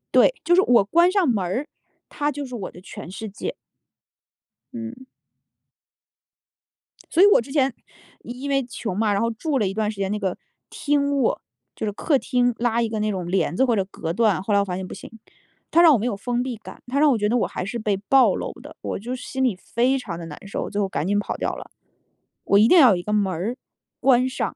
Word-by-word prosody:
对， - - +6
就 350 +1 +4
是 370 - +6
我 245 - +5
关 340 - +4
上 375 -5 +2
门 210 -6 +1
儿， 245 - -2 0.4
它 295 0 -2
就 290 0 -5
是 250 -1 -7
我 195 -5 -6
的 180 - -13
全 190 -1 -10
世 220 +3 -6
界。 200 - -5 1.2
嗯。 240 +2 -7 2.1
所 340 - +3
以 - - +9
我 405 - +5
之 270 +3 -11
前 270 -4 +2 0.5
因 255 +4 -6
为 275 -1 +1
穷 220 -5 -5
嘛， 215 -2 +2
然 200 - 0
后 230 - +1
住 275 +4 -2
了 205 - +1
一 190 - -3
段 215 0 -1
时 205 - -12
间 195 0 -2
那 210 - -2
个 190 -3 -2 0.3
厅 285 -1 0
卧， 270 - +1 0.3
就 - - -4
是 205 - -1
客 280 +7 +1
厅， 245 -1 +1
拉 235 0 +1
一 230 - 0
个 220 -1 -3
那 215 0 0
种 185 -3 -4
帘 175 -3 0
子， 265 - +3
或 240 - +2
者 195 -2 0
隔 165 -4 -5
断， 215 -3 +2
后 210 - -1
来 200 - +5
我 200 - +1
发 180 - -4
现 185 0 -5
不 - - -8
行， - - -10 0.6
它 340 - +5
让 325 -3 +8
我 - - +4
没 220 - -3
有 230 -5 -1
封 245 +4 -2
闭 250 -3 -4
感， 220 - -12
它 275 +3 -1
让 300 -1 +5
我 245 - +2
觉 210 -1 0
得 245 - +2
我 - - +1
还 185 - -5
是 235 +4 -4
被 210 -2 0
暴 260 +7 +4
露 - - -4
的， - - -12
我 - - -4
就 245 +5 -5
是 - - -9
心 265 -1 -2
里 240 -7 +2
非 245 +7 0
常 190 -9 -6
得 170 - -7
难 165 +5 -10
受， - - -4
最 205 0 -2
后 195 - -1
赶 175 - -2
紧 205 +1 +2
跑 - - -3
掉 - - -2
了。 - - -10 0.7
我 200 - +4
一 220 - +6
定 360 - +6
要 255 -7 +8
有 - - +3
一 175 - -6
个 210 +3 -3
门 200 -3 +1
儿 215 +10 -3 0.4
关 255 -1 +4
上。 - - -3
230 Hz, 265 characters per minute, -23 LUFS, 200-260 Hz, 2.1 s, 以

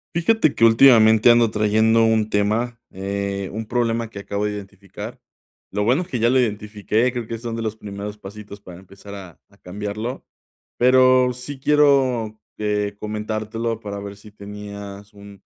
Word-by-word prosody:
Fíjate 170 -2 +2
que - - -1
últimamente 115 -1 +6
ando 120 -1 +4
trayendo 110 +2 +2
un 110 -1 +2
tema, 110 +4 0
eh, 100 0 -4
un 110 +2 -5
problema 115 -1 -1
que 100 - -8
acabo 100 +1 -3
de 105 - -1
identificar. 100 -1 -9 0.5
Lo 105 +1 -1
bueno 130 +10 +2
es - - -14
que 125 - -3
ya 115 +1 +3
lo 130 +1 +3
identifiqué. 105 +1 -1
Creo 120 -2 -4
que 115 0 -6
son 115 -1 -5
de 115 - -4
los 110 -1 -3
primeros 105 0 -8
pasitos 105 0 -11
para 90 -3 -12
empezar 100 +2 -12
a 95 -4 -11
a 100 - -25
cambiarlo. 105 +6 -6 0.5
Pero 130 0 +4
sí 130 +3 -8
quiero, 130 -7 +2 0.2
eh, 105 -1 -1
comentártelo 110 +1 -4
para 100 -2 -6
ver 100 0 -8
si 105 +1 -16
tenías 100 0 -9
un 100 -1 -14
110 Hz, 165 wpm, -21 LUFS, 100-120 Hz, 0.5 s, últimamente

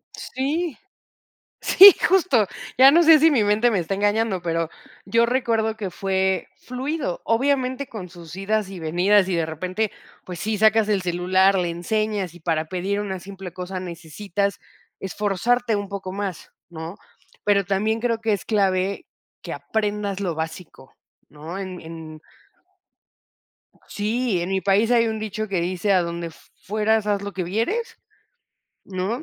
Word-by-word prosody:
Sí. 295 +4 -3 0.8
Sí, 395 +2 +10 0.2
justo. 330 - +3 0.3
Ya 265 +2 +9
no 340 +3 +6
sé, 325 -1 +8
si 320 +2 +5
mi 245 -6 +3
mente 210 +4 +3
me 190 - +1
está 170 +4 -2
engañando, 205 0 +1
pero, 165 -1 -1 0.4
yo 230 +4 +3
recuerdo 230 -3 0
que 200 -3 -4
fue 190 0 0
fluido. 260 - -4
Obviamente, 260 +2 0
con 195 -5 -7
sus 170 -1 -11
idas 200 +1 -1
y 190 - -8
venidas. 185 +5 +3
Y 185 - 0
de 165 -1 +1
repente, 185 +7 -2 0.3
pues 180 -2 -7
sí, 215 +4 -1
sacas 220 +1 +4
el 200 -3 +1
celular, 185 +2 +2
le 175 -1 0
enseñas. 195 +1 -2
Y 175 - -14
para 160 -1 -1
pedir 190 +4 -2
una 195 -2 -4
simple 190 -1 -9
cosa, 185 0 -5
necesitas 185 +3 -3 0.4
esforzarte 210 +5 0
un 205 -1 -4
poco 190 -2 -6
más, 195 -3 -5 0.2
¿no? 165 +1 -7 0.5
Pero 200 -1 +3
también, 210 +4 0
creo 230 -1 0
que 225 -1 0
es 200 - -2
clave, 195 -2 0 0.4
que - - -6
aprendas 210 -2 -2
lo 180 -4 -1
básico, 160 -3 -7 0.3
¿no? 155 +5 -8
En 185 -2 -6
en 160 -1 -9 1.7
Sí, 215 -2 -1
en 175 - -3
mi 190 0 0
país, 200 +4 +2
hay 230 -1 +4
un 220 -1 -3
dicho 215 0 -4
que 185 -3 -1
dice: 185 +3 0
"A 185 - +4
donde 170 0 -4
fueras, 215 +5 -2
haz 205 -1 +1
lo 200 0 -5
que 185 - -2
vieres", 405 - -2 0.9
¿no? 195 +8 -3
200 Hz, 155 wpm, -23 LUFS, 180-220 Hz, 1.7 s, Sí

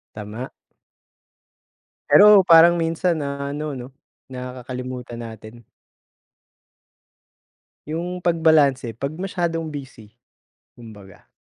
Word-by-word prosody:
Tama. 110 +4 -7 1.6
Pero 210 -1 +8
parang 170 -1 +6
minsan 165 0 -1
na 140 0 -4
ano 150 -2 -5
'no, 125 +2 -10 0.4
Nakakalimutan 125 -1 -7
natin. 110 0 -11 2.3
Yung 175 +3 -4
pagbalanse 160 -8 +2
'pag 140 +3 -4
masyadong 170 -3 -3
busy, 130 -7 -10 0.6
kumbaga. 105 -5 -15
140 Hz, 80 wpm, -21 LUFS, 120-165 Hz, 2.3 s, Pero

